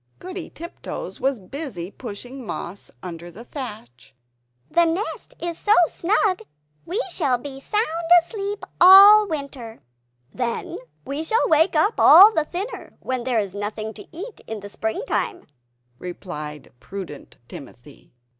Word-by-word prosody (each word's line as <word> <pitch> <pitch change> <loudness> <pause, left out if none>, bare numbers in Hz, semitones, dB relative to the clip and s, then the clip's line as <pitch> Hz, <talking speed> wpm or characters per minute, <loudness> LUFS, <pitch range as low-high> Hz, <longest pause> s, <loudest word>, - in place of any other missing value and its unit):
Goody 370 -1 -7
Tiptoes 340 +2 -8
was 270 -1 +1
busy 200 - -6
pushing 245 +4 -8
moss 200 -3 -6
under 175 -1 -7
the 220 +7 -12
thatch 210 - -9 0.6
"The 340 0 +4
nest 340 +6 -3
is 340 -1 -4
so 420 +1 +4
snug, 375 +3 0 0.5
we 370 +7 -1
shall 280 -8 +1
be 270 +2 -8
sound 425 +8 0 0.3
asleep 400 +3 -5 0.2
all 400 +3 +10
winter." 280 - -6 0.6
"Then 240 -2 -3 0.3
we 285 +3 -3
shall 445 +9 +2
wake 320 +1 +3
up 360 +9 +2
all 415 +3 +9
the 315 -5 +1
thinner, 385 +9 -6
when 255 -2 -3
there 250 -3 +1
is 200 -3 -3
nothing 215 +2 -5
to - - -12
eat 390 +8 -8
in 210 -2 -6
spring 220 - -3
time," 365 - -2 0.5
replied 150 -5 -8
prudent 190 -7 -9
Timothy. 135 +1 -13
275 Hz, 135 wpm, -23 LUFS, -, 0.6 s, all